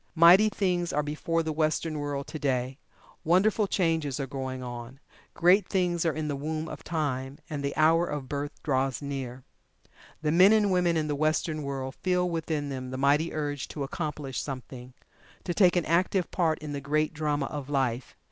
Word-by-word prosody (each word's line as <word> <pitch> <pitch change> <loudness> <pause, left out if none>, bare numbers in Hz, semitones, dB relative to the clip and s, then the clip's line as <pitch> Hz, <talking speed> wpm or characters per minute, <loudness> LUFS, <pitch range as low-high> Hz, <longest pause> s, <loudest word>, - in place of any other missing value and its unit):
Mighty 175 +6 +7
things 180 -4 0
are 150 - 0
before 165 +3 -1
the 160 -1 -2
Western 155 0 0
world 145 -1 -3
to 155 - -7
day 130 -1 -1 0.4
wonderful 200 +5 +3
changes 160 -8 0
are 135 - -1
going 130 -1 -5
on 120 +1 -7 0.4
great 180 +3 +4
things 175 -3 +1
are - - +3
in 155 -1 -2
the 145 - -1
womb 155 +3 -3
of - - -8
time, 140 -4 -2
and 145 -2 -3
the 140 - -2
hour 165 +2 +4
of 145 -3 -4
birth 145 +2 -5
draws 135 -1 0
near. 130 -3 -5 0.8
The 150 - +2
men 185 +6 +7
and 210 -2 +3
women 175 -2 +2
in 155 - 0
the 150 - -1
Western 155 +1 0
world 135 -2 -4
feel 180 +1 0
within 160 -4 -2
them 130 -2 -5
the 130 - -5
mighty 145 +4 +2
urge 145 -3 -3
to 145 - -5
"accomplish" 150 -2 -4
something 130 -2 -8 0.5
to 175 - -2
take 180 -1 +4
an 175 - +1
active 180 +2 +1
part 160 -3 +1
in 150 -2 -7
the 140 - -4
great 150 +3 0
drama 150 -2 -1
of 145 -1 -6
life. 130 -4 -1
150 Hz, 185 wpm, -28 LUFS, 135-170 Hz, 0.8 s, Mighty